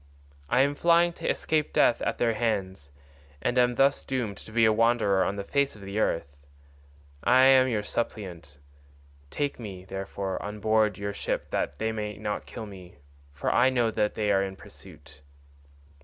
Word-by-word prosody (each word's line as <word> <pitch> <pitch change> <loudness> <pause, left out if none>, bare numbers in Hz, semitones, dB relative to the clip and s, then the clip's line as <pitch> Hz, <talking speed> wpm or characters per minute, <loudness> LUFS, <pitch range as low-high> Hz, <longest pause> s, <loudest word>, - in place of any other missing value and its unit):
I 125 - +4
am 140 +1 +2
flying 170 +3 +3
to - - -4
escape 155 -1 0
death 120 - +3
at - - -1
their 115 -1 +1
hands, 95 -10 -2 0.5
and 120 - -1
am 125 0 +3
thus 135 +2 +3
doomed 120 -7 -3
to - - -12
be 115 0 +4
a 110 - +4
wanderer 110 -4 +3
on 100 - -1
the 100 - -4
face 140 +5 0
of 105 - -13
the 100 +2 -4
earth. 70 -8 -1 0.9
I 130 +2 +5
am 130 -1 +6
your 110 -4 -1
suppliant; 90 -11 -5 0.7
take 145 - -3
me, 95 -5 -8
therefore, 95 0 -4
on 105 +1 -6
board 110 -1 +2
your 100 0 -4
ship - - -3
that 75 - -2
they 110 0 -1
may 105 -1 -4
not 105 0 -4
kill 110 - -7
me, 95 -3 -12 0.4
for 70 - -2
I 125 +2 +5
know 120 -3 +1
they 105 0 0
are 95 -1 +3
in 95 -1 -3
pursuit." 75 -4 -15
105 Hz, 175 wpm, -27 LUFS, 95-120 Hz, 0.9 s, am